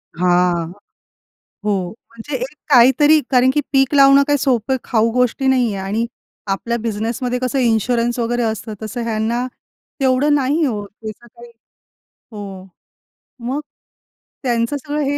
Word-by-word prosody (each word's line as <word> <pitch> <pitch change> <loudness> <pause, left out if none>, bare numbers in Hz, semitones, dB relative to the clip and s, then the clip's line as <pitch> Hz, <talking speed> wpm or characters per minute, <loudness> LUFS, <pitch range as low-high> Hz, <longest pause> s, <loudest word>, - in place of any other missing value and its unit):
हां. 175 -1 +1 0.9
हो. 195 -4 0 0.2
म्हणजे 230 +5 -7
एक 265 +5 -6
काहीतरी 275 +4 +6
कारण 255 0 +4
की 295 - +2
पीक 270 0 +2
लावणं 275 0 +7
काही 290 0 +3
सोपं 260 -1 +1
खाऊ 225 -1 +1
गोष्टी 250 +2 +1
नाही 250 -5 +2
आहे 190 - -4
आणि 225 +4 0 0.4
आपल्या 215 +5 -1
बिझनेसमध्ये 230 +3 -2
कसं 255 +1 -1
इन्शुरन्स 240 +1 +1
वगैरे 240 +1 0
असतं. 220 0 -3
तसं 235 +3 -4
ह्यांना, 230 +2 -1 0.5
तेवढं 270 +2 +2
नाही 280 +1 +1
आहे 320 -4 +2
हो. 210 -4 -3
त्याचं 220 +3 -10
काही 235 +1 -15 0.8
हो. 195 -3 -8 0.8
मग 260 +4 -2 0.8
त्यांचं 235 +1 0
सगळं 295 +2 -3
हे 285 +1 0
240 Hz, 140 wpm, -19 LUFS, 220-265 Hz, 0.9 s, लावणं